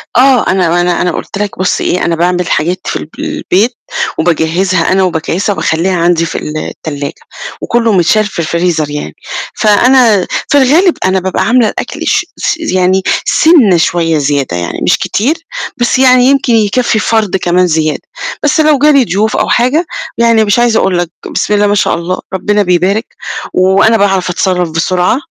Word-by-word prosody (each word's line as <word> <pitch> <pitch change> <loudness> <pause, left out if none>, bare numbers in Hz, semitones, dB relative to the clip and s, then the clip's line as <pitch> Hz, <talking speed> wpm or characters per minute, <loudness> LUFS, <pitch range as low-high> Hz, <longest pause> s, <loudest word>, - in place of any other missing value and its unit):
آه، 255 -1 +4
أنا 175 -2 +1
أنا 175 0 0
أنا 180 - 0
قُلت 180 - -6
لك 205 -2 -4
بُصّ 185 - 0
إيه، 180 - -1
أنا 170 - 0
باعمل 180 +1 0
حاجات 175 +4 -1
في - - -2
الب - - -6
البيت، 225 +6 -1 0.4
وباجهّزها 170 +2 0
أنا 190 0 +2
وباكيّسها 180 +3 -1
وباخلّيها 180 +1 -1
عندي 170 -1 +1
في - - -5
التلّاجة، 150 -1 -6 0.4
وكلّه 230 -2 0
مِتشال 195 +4 +2
في 205 - -6
الفريزر 170 -2 -1
يعني، 145 - -6 0.4
فأنا 220 -1 +3 0.2
في 285 - +2
الغالب 315 +7 +3
أنا 190 0 +1
بابقى 190 +1 -2
عاملة 235 0 +3
الأكل - - -5
ش - - +1
س - - -1
يعني 185 - +1 0.2
سِنة 270 - +4
شويّة 165 -1 +1
زيادة 140 -9 -1
يعني، 85 0 -4
مش - - +2
كتير، 260 +10 -1 0.4
بس 240 +1 +1
يعني 255 -1 +5
يمكن 275 -2 +2
يكفّي 220 +1 +1
فَرد 215 -3 0
كمان 180 0 +1
زيادة، 155 -2 -1 0.4
بس 300 +2 +1
لو 305 -2 +4
جه 300 +3 +4
لي 275 -3 +4
ضيوف 215 +2 -1
أو - - 0
حاجة 260 +8 +1 0.3
يعني 230 -1 +3
مش 205 +3 +1
عايزة 235 -2 +2
أقول 190 -2 0
لك، 175 -1 -2 0.2
بسم - - -1
الله 205 0 +2
ما 205 - +1
شاء 205 - +1
الله 170 +2 -3
ربنا 205 +2 0
بيبارك، 185 +5 +1 0.5
وأنا 195 +5 +3
باعرف 195 -3 +1
أتصرّف 180 -1 -1
بسرعة، 180 +6 0
190 Hz, 170 wpm, -11 LUFS, 175-230 Hz, 0.5 s, يعني